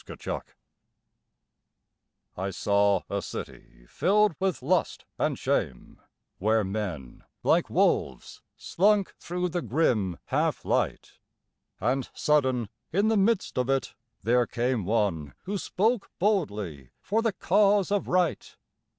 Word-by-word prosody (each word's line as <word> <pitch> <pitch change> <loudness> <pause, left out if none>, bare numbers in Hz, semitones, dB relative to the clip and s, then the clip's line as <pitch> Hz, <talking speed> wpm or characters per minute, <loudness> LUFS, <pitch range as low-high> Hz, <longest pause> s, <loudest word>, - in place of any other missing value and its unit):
Anarchy - - -4 2.0
I 95 +2 -3
saw 100 0 +2
a - - -2
city - - -9
filled 210 - +2
with 190 -8 -1
lust 175 +5 0
and - - 0
shame, 60 - -2 0.4
Where 110 +2 +2
men, 95 - -5 0.2
like - - +3
wolves, - - 0 0.2
slunk 200 +1 +2
through 180 +1 -2
the 175 +1 -2
grim 110 - +1
half - - 0
light; - - -1 0.6
And 130 0 0
sudden, 130 -7 +1 0.2
in 200 +5 +2
the 225 - +3
midst 200 - +1
of 125 +1 0
it, 135 -1 0 0.3
there 120 +2 +3
came 120 -4 -1
One 95 -9 0
who 200 +1 -3
spoke 220 +5 0
boldly 105 - -1
for 220 +3 +1
the 225 -2 0
cause 200 +2 +3
of 205 -1 0
Right. 180 -2 0
135 Hz, 120 wpm, -27 LUFS, -, 2.0 s, like